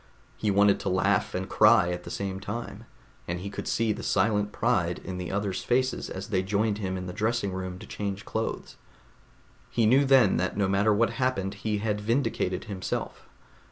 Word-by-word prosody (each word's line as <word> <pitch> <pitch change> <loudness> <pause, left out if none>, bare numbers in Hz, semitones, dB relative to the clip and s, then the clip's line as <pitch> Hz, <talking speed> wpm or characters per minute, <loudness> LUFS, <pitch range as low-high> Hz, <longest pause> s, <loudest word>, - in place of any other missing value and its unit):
He 110 - -1
wanted 100 0 +4
to 100 - -2
laugh 95 +1 +1
and 95 +1 -2
cry 90 0 +5
at 90 0 -5
the - - -7
same 95 -1 -3
time, 105 +2 -6 0.4
and 85 +1 -2
he 100 +2 -6
could - - -6
see 115 -1 +1
the - - -7
silent 105 -2 +1
pride - - +1
in 90 0 -5
the 90 - -4
others' 100 -1 -2
faces 130 +1 0
as 95 +2 -6
they 95 -3 +1
joined 105 +2 0
him 95 -2 -2
in 90 - -5
the 90 - -6
dressing 110 -2 -1
room 95 -1 -4
to - - -10
change 100 0 -5
clothes. 110 0 -4 0.9
He 115 - +1
knew 130 +6 +5
then 130 -7 +5
that 90 +2 -1
no 100 -2 +2
matter 100 +3 +3
what 115 +3 +2
happened 115 -6 -1
he 105 +1 -2
had 105 0 -1
vindicated 110 -5 0
himself. 100 -3 -5
100 Hz, 190 wpm, -27 LUFS, 95-110 Hz, 0.9 s, cry